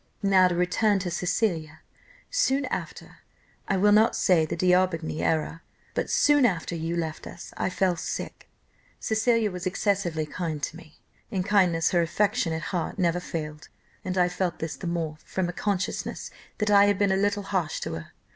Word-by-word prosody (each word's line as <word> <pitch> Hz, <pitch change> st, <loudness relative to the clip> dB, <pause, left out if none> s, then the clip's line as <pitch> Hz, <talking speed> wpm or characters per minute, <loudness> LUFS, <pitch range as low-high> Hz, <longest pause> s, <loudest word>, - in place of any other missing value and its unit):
"Now 190 Hz, -2 st, +5 dB
to 180 Hz, -, -1 dB
return 180 Hz, +4 st, +2 dB
to 180 Hz, -2 st, -3 dB
Cecilia; 170 Hz, -4 st, -1 dB, 0.5 s
soon 285 Hz, -, +2 dB
after, -, -, -6 dB, 0.5 s
I 195 Hz, -, +1 dB
will 205 Hz, +2 st, +4 dB
not 215 Hz, +2 st, +5 dB
say 165 Hz, -4 st, +3 dB
the -, -, -3 dB
D'Aubigny 180 Hz, -3 st, +1 dB
era, 160 Hz, +1 st, 0 dB, 0.3 s
but -, -, -2 dB
soon 290 Hz, -1 st, +4 dB
after 180 Hz, -7 st, +1 dB
you 165 Hz, +1 st, -2 dB
left 160 Hz, -2 st, -4 dB
us, -, -, -10 dB
I -, -, -1 dB
fell 185 Hz, -1 st, +1 dB
sick, 165 Hz, -, -6 dB, 0.5 s
Cecilia 220 Hz, -1 st, +1 dB
was 180 Hz, 0 st, -4 dB
excessively 185 Hz, -5 st, 0 dB
kind 160 Hz, -1 st, -4 dB
to 155 Hz, -, -2 dB
me. 160 Hz, -2 st, -14 dB, 0.3 s
In 190 Hz, -5 st, -1 dB
kindness 180 Hz, -5 st, +3 dB
her 175 Hz, -, +3 dB
affectionate 170 Hz, -2 st, 0 dB
heart 175 Hz, +1 st, -2 dB
never 175 Hz, -2 st, +1 dB
failed, 150 Hz, -3 st, -6 dB, 0.3 s
and 185 Hz, 0 st, -3 dB
I 180 Hz, -1 st, +4 dB
felt 180 Hz, 0 st, -2 dB
this 160 Hz, -1 st, -4 dB
the 180 Hz, -, -6 dB
more, 165 Hz, -3 st, -3 dB
from 185 Hz, -2 st, -2 dB
a -, -, -4 dB
consciousness 200 Hz, +1 st, -3 dB, 0.3 s
that 210 Hz, -1 st, 0 dB
I 200 Hz, 0 st, +7 dB
had 205 Hz, -1 st, +2 dB
been 200 Hz, -1 st, +2 dB
a -, -, +3 dB
little 205 Hz, +1 st, 0 dB
harsh 185 Hz, -5 st, -1 dB
to -, -, -4 dB
her. 80 Hz, 0 st, -8 dB
180 Hz, 175 wpm, -26 LUFS, 165-200 Hz, 0.5 s, I